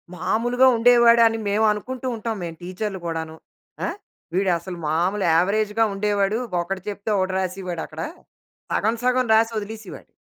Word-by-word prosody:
మాములుగా 240 +8 +2
ఉండేవాడని 235 -1 +5
మేము 210 +2 +2
అనుకుంటూ 255 +5 -4
ఉంటాం 225 0 -3
మేం 170 -1 -5
టీచర్లు 190 +2 -4
గూడాను. 160 -1 -4 0.5
ఆహ్, - - -5 0.4
వీడసలు 180 -2 0
మామూలు 175 +5 +1
అవరేజ్‌గా 210 +4 +1
ఉండేవాడు. 205 +1 0 0.2
ఒకటి 190 +2 -4
చెప్తే 205 +1 -5
ఒకటి 185 0 0
రాసేవాడు 185 -2 -4
అక్కడ. 155 +1 -8 0.7
సగం 220 +2 +1
సగం 255 -1 +2
రాసి 225 +1 +3
ఒదిలేసేవాడు. 215 -1 -9
205 Hz, 130 wpm, -23 LUFS, 185-225 Hz, 0.7 s, ఉండేవాడని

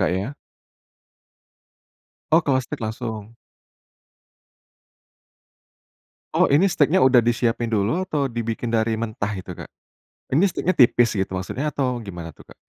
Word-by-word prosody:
Kak, 95 - +2
ya? 105 +9 -3 2.0
Oh, 165 - +7
kalau 135 -4 +1
steak - - -7
langsung? 110 0 -5 3.0
Oh, - - +4
ini 145 +7 +4
steaknya 175 -2 +3
udah 130 -2 +6
disiapin 120 0 0
dulu 115 - 0
atau 145 -2 0
dibikin 115 -1 -3
dari 110 0 +1
mentah 110 -2 -3
itu, 95 -1 -7
Kak? - - -10 0.6
Ini 150 +8 +3
steaknya 185 0 -1
tipis 120 -2 +5
gitu 95 0 -2
maksudnya 130 +11 -3
atau 125 -3 -1
gimana 90 -7 -8
tuh, - - -15
Kak? - - -16
120 Hz, 130 wpm, -22 LUFS, 110-140 Hz, 3.0 s, Oh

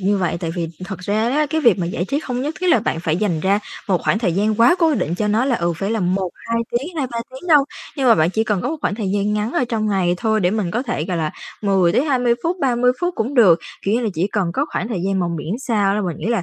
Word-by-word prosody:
như 200 +2 +2
vậy, 180 -2 0
tại 165 - -2
vì 170 -2 -2 0.2
thật 195 -2 -6
ra 215 +5 0
đó, 300 +3 +2
cái 320 0 +1
việc 235 - +4
mà 175 - -1
giải 175 0 -2
trí 280 +9 -1
không 250 -5 -3
nhất 300 +3 -3
thiết 365 - 0
là 330 - +4
bạn 165 - -2
phải 165 -2 0
dành 180 -5 0
ra 195 +4 +2 0.3
một 185 -3 +2
khoảng - - +1
thời 210 -7 0
gian 210 +5 +1
quá 235 +9 +6
cố 325 -3 +3
định 175 - -1
cho 210 +3 -1
nó 220 +4 +2
là, 260 -3 +1
ừ, 170 -2 0
phải 195 +5 -2
là 225 -1 0
1-2 185 +5 -2
tiếng, 295 +9 -3
2-3 255 -5 -2
tiếng 265 +7 -10
đâu. 295 -4 +6 0.3
Nhưng 265 -2 +2
mà 230 - +8
bạn 160 -3 +2
chỉ 220 +3 0
cần 210 -4 0
có 250 - -1
một 320 - -2
khoảng 205 - -1
thời 210 -3 -3
gian 205 +1 0
ngắn 210 +2 -1
ở - - +1
trong 220 -2 -1
ngày 185 -3 +1
thôi 220 +1 +1
để 180 -2 +2
mình 205 -4 -1
có 235 +7 -1
thể, 240 - -2
gọi 180 0 -2
là, 155 -2 -1 0.3
10-20 235 - +2
phút, 340 +2 0
30 250 -2 +3
phút 355 0 -1
cũng 240 +6 -2
được, 195 -10 +6 0.3
kiểu 200 - +1
như 240 - +1
là, 230 - 0
chỉ 170 +4 +1
cần 185 -5 0
có 280 - 0
khoảng - - -2
thời 205 -7 -3
gian 195 0 0
mà 175 - 0
miễn 160 +5 -3
sao 210 -6 +1
đó 210 - 0
mình 170 - -3
nghĩ 165 - -5
là 230 -4 +1
210 Hz, 295 wpm, -20 LUFS, 185-245 Hz, 0.3 s, mà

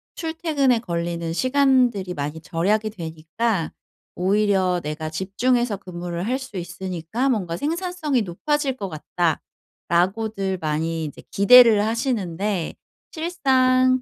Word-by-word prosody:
출퇴근에 320 -6 +1
걸리는 170 -3 -3
시간들이 255 -5 +2
많이 150 +1 -4
절약이 205 +7 0
되니까 165 +2 -2 0.4
오히려 190 -1 +2
내가 155 +1 -4
집중해서 210 +6 0
근무를 175 -1 -5
할 255 +2 +1
수 260 -7 -8
있으니까 180 +7 -3
뭔가 180 -8 -1
생산성이 325 -4 -1
높아질 270 - -1
것 195 -4 -4
같다.'라고들 185 +5 -2
많이 160 +1 -1
이제 150 - -8
기대를 225 0 +7
하시는데 210 - -1 0.4
실상 255 -6 +2
200 Hz, 280 characters per minute, -23 LUFS, 170-255 Hz, 0.4 s, 기대를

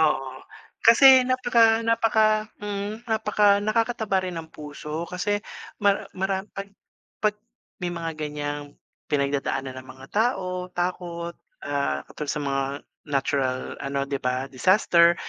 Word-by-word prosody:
Oo. 150 -4 +2 0.5
Kasi 260 +3 +8
napaka 235 -3 +3
napaka 220 -1 +3
mm, 205 +3 -5
napaka 210 -2 +3
nakakataba 220 -1 0
rin 180 -1 -4
ng 160 -1 -9
puso 150 +2 -6
kasi 205 +4 -1 0.4
mar 200 -1 +2
maram 190 0 -1
'pag 195 0 -7 0.5
'pag 210 -1 +3 0.4
may 180 -2 -3
mga 165 -1 -3
ganiyang 145 -1 -4 0.3
pinagdadaanan 140 -2 -1
ang 130 - -11
mga 130 +1 -13
tao, 185 -5 -1
takot, 175 -1 -3 0.3
ah, 140 - -1
katulad 150 -1 -4
sa 150 - -3
mga 135 -1 0 0.4
natural, 135 -2 0 0.2
ano, 140 0 -1
'di 140 0 -2
ba, 125 +1 -1
disaster, 170 - +4
180 Hz, 125 wpm, -25 LUFS, 145-215 Hz, 0.5 s, Kasi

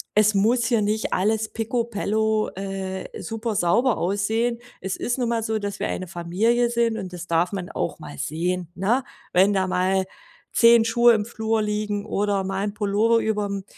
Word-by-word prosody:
es 215 0 +5
muss 230 +4 +3
hier 230 -3 +2
nicht 215 +1 -1
alles 215 +3 +1
pikobello, 220 -2 0
äh, 190 0 -5
super 225 0 -3
sauber 220 +8 +2
aussehen.” 220 +6 0 0.2
Es 190 0 -3
ist 240 - -2
nun 245 -2 0
mal 230 -1 0
so, 220 0 -1
dass 205 -1 -5
wir - - -1
eine 185 - -4
Familie 195 +8 +1
sind, 235 -1 +1
und 190 -4 -6
das 175 -1 -7
darf 170 +3 +1
man 185 -2 -4
auch - - -3
mal 75 -1 -9
sehen, 175 - -2
ne? 225 +9 +1 0.3
Wenn 190 +3 +5
da 190 -1 +1
mal 185 +1 +1 0.5
10 230 -1 +6
Schuhe 235 +1 +5
im 210 -2 0
Flur 220 -1 -1
liegen 210 -1 -2
oder 205 -2 0
mal 195 +1 -2
'n 205 - -3
Pullover 215 +2 +2
überm 205 -3 -2
210 Hz, 180 wpm, -24 LUFS, 190-225 Hz, 0.5 s, 10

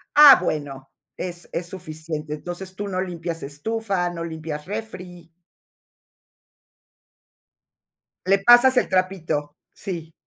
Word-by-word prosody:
Ah, 290 -2 +10
bueno. 145 -5 -4 0.3
Es 175 -1 -6
es 170 - -3
suficiente. 155 -3 -5
Entonces, 175 +4 -7
tú 205 +1 -4
no 185 -1 -3
limpias 170 -2 -5
estufa, 185 +5 -2
no 170 -1 -6
limpias 160 -2 -6
refri. 185 -5 -7 3.0
Le 195 +2 +4
pasas 245 +2 +7
el - - +3
trapito. 165 -6 -1 0.2
Sí. 165 -5 -6
175 Hz, 105 wpm, -23 LUFS, 160-195 Hz, 3.0 s, Ah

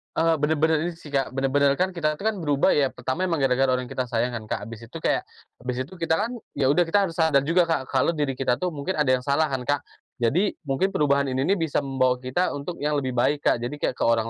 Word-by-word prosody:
Eee, 165 -1 +3
benar-benar 160 +2 +2
ini 170 +3 -2
sih, 165 -2 -13
Kak, 135 -3 -1
benar-benar 135 +1 +2
kan 185 +7 0
kita 165 -4 -1
tuh 150 - -11
kan 215 - -4
berubah, 145 -5 +2
ya. 140 -3 +2
Pertama, 130 +9 -2
emang 165 -5 -1
gara-gara 135 0 +3
orang 125 -1 -2
yang - - -7
kita 130 - 0
sayang 120 0 0
kan, 110 - -9
Kak? - - -3
Habis 115 0 -9
itu 115 - -9
kayak, - - 0 0.3
habis 125 0 -4
itu, 140 +8 -8
kita 165 -1 0
kan, 225 +3 -2 0.2
ya 135 -2 +1
udah, 170 +5 +4
kita 165 +5 +2
harus 165 - -10
sadar 160 -4 +4
juga 170 +5 +3
Kak, 160 -6 -1
kalau 135 +5 +2
diri 145 -5 -2
kita 125 +1 0
tuh 180 - +1
mungkin 155 +3 -3
ada 150 -5 +1
yang 130 -1 +2
salah 145 +2 +2
kan, 130 -2 -3
Kak. 145 +2 +1 0.4
Jadi, 170 - +2 0.2
mungkin 185 +9 +1
perubahan 140 -1 +2
ini 130 - 0
nih 190 +9 +2
bisa 165 -4 0
membawa 130 -2 0
kita 130 +9 0
untuk 145 +5 -5
yang 150 +1 -1
lebih 130 - -2
baik, 145 +4 +2
Kak. - - +3
Jadi 120 +3 -4
kayak 125 - -1
ke - - 0
orang 115 -1 +2
140 Hz, 260 wpm, -24 LUFS, 130-165 Hz, 0.4 s, udah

